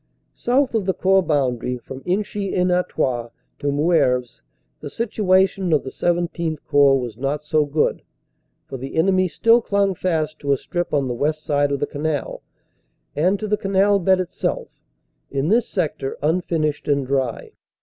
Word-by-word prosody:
South 255 +2 +1
of 215 -4 -1
the 190 - +1
Corps 190 0 +3
boundary, 125 -6 -1
from 130 +2 -10
Inchy 195 +1 -2
en 180 0 +2
Artois 130 -9 0 0.3
to 145 - -1
Moeuvres, 140 -5 +1 0.4
the - - -7
situation 190 -4 +1
of 150 -3 +3
the 130 - -6
XVII 170 -2 -1
Corps 140 -1 +5
was 120 -4 -6
not 140 +3 -2
so 150 0 +1
good, 145 +1 0 0.6
for 135 - -7
the 135 +2 -7
enemy 185 +3 +3
still 230 +6 +3
clung 200 -3 +1
fast 155 -4 -2
to 140 -1 +1
a - - +1
strip 175 +6 -4
on 140 -3 +1
the 125 - -2
west 155 +5 -1
side 145 -1 +1
of 140 - -1
the 145 - 0
canal, 145 0 -3 0.7
and 180 +7 +2
to 215 - -3
the 210 0 +1
canal 200 +1 +2
bed 190 +1 +3
itself, 180 -2 -3 0.6
in 140 +3 -1
this 230 +3 +2
sector 150 -7 -2
unfinished 155 -2 0
and 140 -2 +1
dry. 130 -3 -2
155 Hz, 165 wpm, -21 LUFS, 140-190 Hz, 0.7 s, Corps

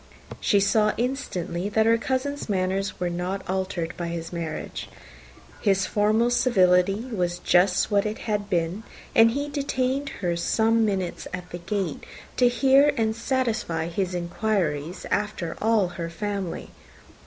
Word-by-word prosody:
She 205 - +3
saw 210 +2 +3
instantly 205 -8 -2
that 220 +1 +2
her 230 0 +4
cousin's 265 +2 -2
manners 190 0 -1
were 180 - 0
not 180 +3 -3
altered 185 -3 -2
by 175 - -3
his 170 0 -5
marriage: 165 -2 -5 0.7
his 195 -2 +2
formal 215 +3 +2
civility 195 -3 +3
was 175 -3 -1
just 180 +3 +3
what 200 -1 +3
it 210 - -4
had 210 -2 -1
been; 175 +2 0 0.3
and 225 0 +7
he 285 +5 -2
detained 275 -1 -1 0.2
her 170 -1 +1
some 225 +6 +2
minutes 190 -4 -2
at 180 -1 -10
the 175 - -5
gate 190 -2 -3 0.3
to 250 - +5
hear 270 +3 +5
and 220 -1 +1
satisfy 225 -10 -1
his 180 +1 -2
inquiries 175 -3 -2
after 195 -5 -1
all 220 -4 +3
her 170 -1 -5
family. 195 0 -4
200 Hz, 145 wpm, -25 LUFS, 175-225 Hz, 0.7 s, and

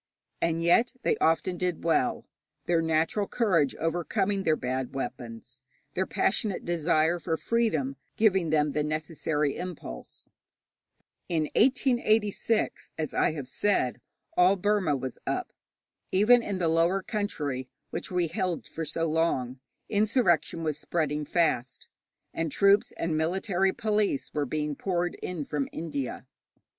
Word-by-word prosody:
And 165 0 +1
yet 230 +9 +4
they - - +2
often 165 +2 +1
did 180 -2 -1
well, 165 -6 +1 0.4
their 170 -1 +2
natural 165 +5 +1
courage 180 - +2
overcoming 180 +5 0
their 160 -4 +2
bad 130 -1 -3
weapons, 125 -1 -6 0.3
their 190 +1 -1
passionate 195 -1 0
desire 170 0 +2
of 160 -2 -1
freedom 160 - 0 0.2
giving 190 -6 +3
them 150 -1 +2
the 150 +1 0
necessary 150 -1 -1
impulse. 175 - -8 1.0
In 160 -3 0
1886, 225 -4 +2
as 155 -2 -3
I - - +2
have 145 -5 -6
said, 130 -5 0 0.3
all 180 +2 +5
Burma 195 -5 +1
was 130 -1 -5
up. - - -2 0.6
Even 225 +6 +5
in 205 -4 -3
the 175 -2 +1
lower 170 +4 +2
country, 145 - -3 0.2
which - - -4
we 180 -1 +1
held 180 0 -2
for 165 - -5
so 165 +2 -1
long, 155 -6 0 0.3
insurrection 205 -6 +2
was 155 -2 -2
spreading 150 -2 -1
fast, 145 -7 0 0.5
and 165 -2 -2
troops 200 +4 +4
and 165 -1 -2
military 190 +4 +1
police 210 -7 0
were 145 -2 -1
being 150 +2 -2
poured 175 0 -1
in 170 -5 -4
from 145 -1 -2
India. 145 -6 -4
165 Hz, 130 wpm, -28 LUFS, 150-195 Hz, 1.0 s, all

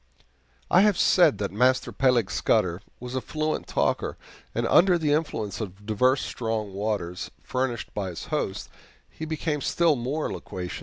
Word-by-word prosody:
I 180 - +7
have 205 -3 +4
said 170 - +5
that 100 0 -2
Master 125 +5 +2
Peleg 125 -7 +2
Scudder 95 -5 +1 0.2
was 125 0 -7
a 130 - -1
fluent 155 +2 -2
talker, - - 0 0.4
and - - 0
under 180 0 +5
the 155 -3 0
influence 115 - -2
of 100 0 -7
divers 125 +5 +2
strong 110 -4 -3
waters, 100 -4 -3
furnished 125 -3 -2
by 100 -3 -3
his 85 - -7
host, - - -2 0.4
he 160 - -8
became 155 -1 -2
still 170 0 +2
more 135 +5 -2
loquacious. 90 0 -6
125 Hz, 155 wpm, -26 LUFS, 105-155 Hz, 0.4 s, I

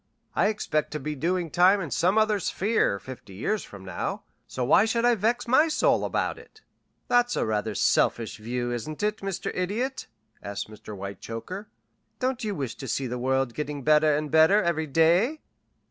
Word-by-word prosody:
I - - +3
expect 180 -8 -1
to 150 - -3
be 150 +2 -4
doing 170 +3 -1
time 185 +3 +5
in 165 -7 -5
some 185 +5 +2
other 215 -1 +3
sphere 195 - +1
fifty 115 -4 -11
years 205 - -1
from 95 -2 -12
now, 95 -2 -4 0.2
so 130 - -3
why 170 - +5
should 230 +1 +1
I 245 - +5
vex 230 +3 0
my 280 +7 +5
soul 310 - +2
about - - -1
it?" 435 - -18 0.5
"That's 245 0 +2
rather 110 0 -1
a - - -13
selfish 110 +1 +1
view, 120 +2 -3
isn't 150 - -5
it, 210 0 +1
Mr. 195 -2 -4
Idiot?" 220 +9 -2 0.3
asked 100 +1 -5
Mr. 105 0 -9
Whitechoker. 115 - -7 0.5
"Don't 255 -1 -1
you 210 -2 -2
wish 135 -6 -3
to 135 - -7
see 130 +3 -1
the 125 0 -4
world 130 -1 0
getting 150 -1 -4
better 150 0 +4
and 150 -1 -4
better 160 +7 +5
every 160 -2 0
day?" 175 - +3
160 Hz, 180 wpm, -26 LUFS, -, 0.5 s, time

